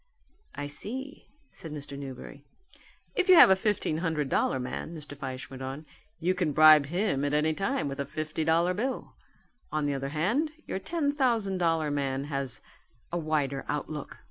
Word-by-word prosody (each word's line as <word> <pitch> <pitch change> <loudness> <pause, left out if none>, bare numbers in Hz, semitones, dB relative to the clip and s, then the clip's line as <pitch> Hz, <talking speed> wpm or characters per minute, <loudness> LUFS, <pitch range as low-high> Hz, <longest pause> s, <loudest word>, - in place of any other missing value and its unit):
"I 145 - -4
see," 255 - -6 0.2
said 160 - -9
Mr. 145 -1 -7
Newberry. 140 0 -8 0.7
"If 375 0 0
you 370 - +10
have 260 - +9
a - - +7
fifteen 190 -5 0
hundred 160 -5 -1
dollar 130 - +1
man," 130 +6 -5
Mr. 150 -1 -8
Fyshe 130 -2 -6
went 135 0 -8
on, 135 +4 -5 0.3
"you 175 +3 +2
can 175 -5 0
bribe 155 -1 +8
him 175 -4 0
at 145 +1 +1
any 155 +1 +2
time 195 - -1
with 140 0 -5
a 140 - -1
fifty 155 0 -3
dollar 165 +3 +3
bill. 255 +7 -3 0.6
On 155 -1 0
the 145 - 0
other 135 0 -3
hand 225 - 0
your - - -3
ten 300 - 0
thousand 230 -9 +1
dollar 165 -3 +1
man 135 -1 -1
has 135 -3 -3 0.5
a 175 - -1
wider 145 -4 -1
outlook. 150 0 -4
155 Hz, 175 wpm, -29 LUFS, 140-190 Hz, 0.7 s, you